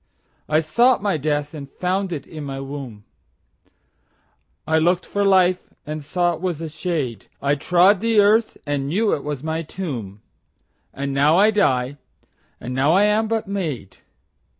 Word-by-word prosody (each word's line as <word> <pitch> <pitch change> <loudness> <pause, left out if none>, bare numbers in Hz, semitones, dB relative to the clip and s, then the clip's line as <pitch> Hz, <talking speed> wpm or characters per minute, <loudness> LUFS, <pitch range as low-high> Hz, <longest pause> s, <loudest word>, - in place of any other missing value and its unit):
13I 155 +1 +2
sought 240 +6 +3
my 200 -3 +1
death 150 0 -1
and 140 -3 -8
found 185 +4 -2
it 150 -5 -5
in 155 -2 -8
my 135 -1 -5 2.1
womb,14I 160 +1 +2
lookt 175 +1 +2
for 205 - -1
life 185 -2 +3
and 155 0 -5
saw 175 +4 0
it 165 - -8
was 180 -4 -2
a 165 -1 -5
shade,15I 145 - -3
trode 180 +5 +4
the 225 0 +2
earth 215 +2 +3
and 145 -2 -2
knew 205 +8 +1
it 140 - -2
was 145 -2 -4
my 160 +1 -2
tomb,16And 140 - -8
now 145 +4 +3
I 210 +3 +5
die, 140 -10 +1 0.6
and 125 - -6
now 135 +5 +3
I 195 +3 +5
am 210 +1 +2
but 225 -2 -1
made. 165 - -4
160 Hz, 150 wpm, -21 LUFS, 145-195 Hz, 2.1 s, I